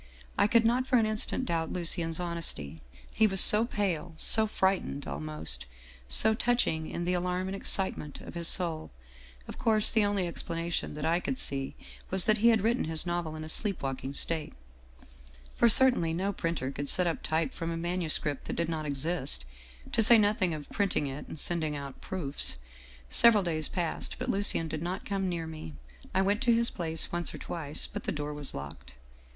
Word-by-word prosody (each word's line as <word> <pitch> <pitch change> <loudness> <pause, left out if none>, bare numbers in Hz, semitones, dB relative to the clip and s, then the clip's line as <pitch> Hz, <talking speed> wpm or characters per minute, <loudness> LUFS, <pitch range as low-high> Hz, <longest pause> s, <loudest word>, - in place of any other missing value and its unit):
I - - +3
could 230 +1 +3
not 250 +3 +1
for 255 - +3
an 225 - +2
instant 215 +4 0
doubt 165 -6 -2
Lucien's 165 -2 -1
hon 175 -1 -4
esty, 80 - -4 0.3
he 220 - +3
was 195 -2 +1
so 210 +5 +11
pale, 185 -7 -3
so 220 +5 +4
frightened 190 -8 -1
almost 75 -3 -4 0.4
so 220 0 +5
touching 220 -9 0
in 170 - -4
the 180 +1 0
alarm 180 +1 -2
and 190 - -4
excitement 190 -6 -2
of - - -11
his 170 -1 0
soul. 165 - +1 0.6
Of - - -9
course 215 -2 +4
the 220 -2 +2
only 205 -2 0
explanation 170 -2 -4
that 150 +1 -5
I 165 +2 +1
could 255 - -4
see 135 - -1 0.3
was 190 -1 +4
that 215 0 +2
he 230 - +3
had 225 -3 +4
written 235 +4 0
his 160 +1 -1
novel 175 -2 -3
in 155 - -7
a - - -7
sleep 195 +3 -2
walking 135 0 -5
state. 160 0 +1 0.5
" 60 0 -24
For 235 - +4
certainly 225 -10 +4
no 195 +3 -2
printer 165 -7 -3
could 140 0 -6
set 180 - +1
up 170 -2 -2
type 155 -3 -2
from 165 - -5
a 165 - -3
manu 175 0 -3
script 145 -2 -1
that - - -5
did 170 -1 -2
not 155 -2 -4
exist, 140 - -3 0.5
to - - +2
say 230 +2 +7
nothing 205 -4 +1
of 150 -2 -9
printing 200 -7 -1
it 135 +1 -7
and 155 - -9
sending 160 -3 -2
out 140 -2 -8
proofs. 150 - -3 0.3
" - - -22
Several 220 -4 +5
days 155 -3 -1
passed, 170 -3 -4
but - - -5
Lucien 195 -4 +2
did 155 -1 -5
not 180 +2 -5
come 195 -2 -2
near 170 -2 -4
me. 155 - -9 0.4
I 190 - +1
went 205 +2 0
to 240 -3 +3
his 235 0 +1
place 165 -3 0
once 175 0 -2
or - - -7
twice, 155 -3 -3
but - - -7
the - - -1
door 150 0 -5
was 145 -2 -3
locked. 70 -2 -9
170 Hz, 200 wpm, -29 LUFS, 150-200 Hz, 0.6 s, so